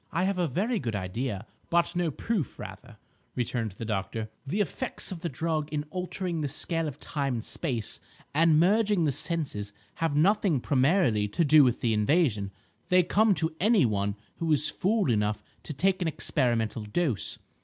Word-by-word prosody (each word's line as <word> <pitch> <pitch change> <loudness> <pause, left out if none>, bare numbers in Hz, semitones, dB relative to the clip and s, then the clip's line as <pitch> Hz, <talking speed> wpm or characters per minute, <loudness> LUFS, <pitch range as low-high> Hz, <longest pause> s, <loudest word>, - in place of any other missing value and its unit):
"I 175 - 0
have 190 -1 0
a 175 - +2
very 210 - 0
good 115 - -3
idea, 100 +3 -3 0.2
but 170 0 +2
no 175 -2 +1
proof 190 - -2
rather," - - -10 0.4
returned 115 -3 -2
the 115 - -7
doctor. 110 +1 -3 0.2
"The 190 +10 -1
effects 215 +2 -2
of 180 - -5
the 170 0 -3
drug 155 +2 -2
in 150 -1 -1
altering 180 -2 -3
the 145 - 0
scale 165 +3 -1
of 145 -1 -7
time 140 -5 -2
and 115 - -4
space, 120 -10 -2 0.3
and 155 +1 +4
merging 205 +1 +3
the 150 - +2
senses 135 - -2 0.2
have 165 -3 0
nothing 185 -1 +3
primarily 130 - +2
to 160 +11 0
do 150 0 +7
with 125 -2 +1
the 115 -2 +2
invasion. 105 - +2 0.4
They 180 -1 +5
come 205 +3 +3
to 160 0 -1
any 210 - +4
one 100 -2 0 0.2
who 165 -1 -1
is 150 0 +3
fool 205 +1 +1
enough 105 -1 0 0.2
to - - -7
take 185 +6 +1
an 175 - +1
experimental 120 -8 0
dose. 105 - -1
150 Hz, 175 wpm, -28 LUFS, 115-175 Hz, 0.4 s, do